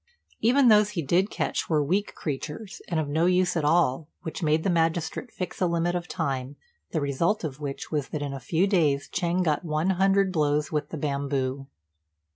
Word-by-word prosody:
Even 250 +4 +4
those 210 -2 +6
he 165 - 0
did 180 +8 +2
catch - - -2
were 155 -3 +3
weak 190 +8 -1
creatures, 155 +6 -5
and 170 -3 0
of 155 - -1
no 160 +4 +2
use 180 0 +2
at 160 - 0
all, 150 -2 +2 0.2
which 160 - -5
made 155 0 +2
the - - +1
magistrate 165 +6 0
fix 180 0 -6
a 180 - +4
limit 170 +1 0
of 175 0 -3
time, 135 -2 -3 0.3
the - - -1
result 155 +9 0
of 145 -3 -4
which 140 -2 -5
was 150 -3 -1
that 150 -2 -3
in 140 -1 -4
a 135 - -5
few 165 +8 +1
days 155 -8 +2
Ch'êng 175 +1 0
got 155 -1 0
one 160 +3 0
hundred 195 +1 +3
blows 150 -2 +1
with 150 -2 -2
the 160 - -5
bamboo. 140 -2 -2
160 Hz, 200 wpm, -26 LUFS, 145-180 Hz, 0.3 s, those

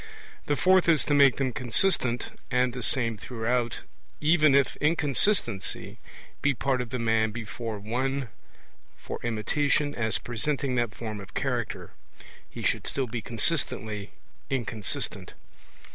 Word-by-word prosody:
The 145 - +2
fourth 185 +5 +4
is 160 -3 +4
to 145 - +1
make 140 -2 +6
them 130 -3 -1
consistent 125 0 +1 0.2
and 125 -1 +2
the 125 - -5
same 115 -2 +1
throughout; 120 +1 -1 0.4
even 155 -2 +5
if 140 -2 +3
inconsistency 150 - 0 0.4
be 145 -1 +2
part 130 +1 0
of 125 - -5
the 125 - -2
man 110 -2 +2
before 115 0 -5
one 130 +5 -2 0.7
for - - -6
imitation 145 +6 +1
as 110 -3 0
presenting 130 +3 -1
that 120 -3 0
form 110 -3 -5
of 100 -1 -11
character, - - -2 0.6
he - - -8
should - - 0
still 135 - -1
be 120 -1 -4
consistently 110 -4 -1 0.4
inconsistent. 115 -5 -2
125 Hz, 130 wpm, -27 LUFS, 115-140 Hz, 0.7 s, make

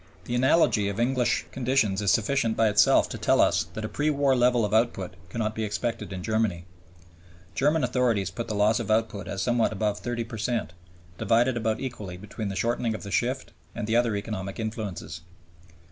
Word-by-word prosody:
The 120 - -5
analogy 120 -5 +3
of 100 +2 -4
English 125 +1 +1
conditions 120 -6 +1
is 100 - +1
sufficient 115 +1 +1
by 110 -1 +4
itself 105 0 +4
to - - -6
tell - - +2
us 80 -1 +3
that 110 - -4
a - - -2
pre 150 +7 -1
war 140 -2 +2
level 120 -2 +3
of 105 - -4
output 110 -5 +1 0.2
cannot 110 +2 -2
be 110 - -3
expected 110 +1 -3
in 95 -2 -5
Germany. 110 -6 0 0.9
German 150 +2 +2
authorities 120 -6 +1
put 115 - -5
the 105 - -3
loss 105 +3 +3
of 115 - -4
output 110 -4 0
at 95 - -4
somewhat 120 -2 +2
above 105 -1 -1
30 120 -1 -3
per 115 -1 -8
cent, 115 -7 -2 0.5
divided 120 +2 +2
about 110 -2 -1
equally 105 -9 -6
between 105 +2 -6
the 100 - -4
shortening 115 +2 0
of - - -8
the 100 - -7
shift 130 +7 -1 0.2
and 115 - -3
the 110 +1 0
other 120 -3 +2
economic 100 -1 -5
influences. 110 -7 -5
110 Hz, 190 wpm, -26 LUFS, 105-120 Hz, 0.9 s, by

